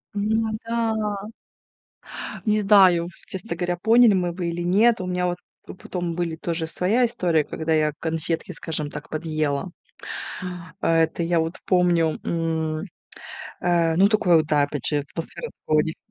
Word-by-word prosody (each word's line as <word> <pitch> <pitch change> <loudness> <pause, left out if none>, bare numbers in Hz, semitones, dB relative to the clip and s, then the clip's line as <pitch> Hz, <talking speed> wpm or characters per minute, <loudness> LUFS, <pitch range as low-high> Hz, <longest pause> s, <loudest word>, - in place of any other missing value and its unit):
М, 205 - -1
ну 220 0 +1
да. 220 -3 -1 1.2
Не 215 -1 +2
знаю, 190 -4 +5 0.2
честно 190 0 -5
говоря, 175 0 -2
поняли 225 +3 +5
мы 180 -2 0
бы 175 -1 -3
или 170 +1 -3
нет. 205 +6 +3
У - - -4
меня 180 0 -1
вот 175 0 -1 0.3
п - - -9
потом 175 -2 -4
были 170 -2 -2
тоже 165 0 -2
своя 195 +9 +2
история, 180 -10 +1
когда 160 +2 -2
я 155 -1 +2
конфетки, 160 0 -3
скажем 155 -2 -2
так, - - -8
подъела. 155 0 -2 1.1
А 165 - +2
это 165 +1 +1
я 170 0 +2
вот 165 +2 -2
помню, 175 -3 +2
м. 160 -1 -1 0.8
Э, 170 -2 +2
ну, 195 +3 +6
такое 205 -5 +4
вот, 155 -1 +2
да, 150 -1 +3
опять 145 -2 -2
же, 150 - +2
атмосфера 165 - -6 0.2
такого 155 0 +4
дефи. 160 0 -4
175 Hz, 160 wpm, -23 LUFS, 160-195 Hz, 1.2 s, ну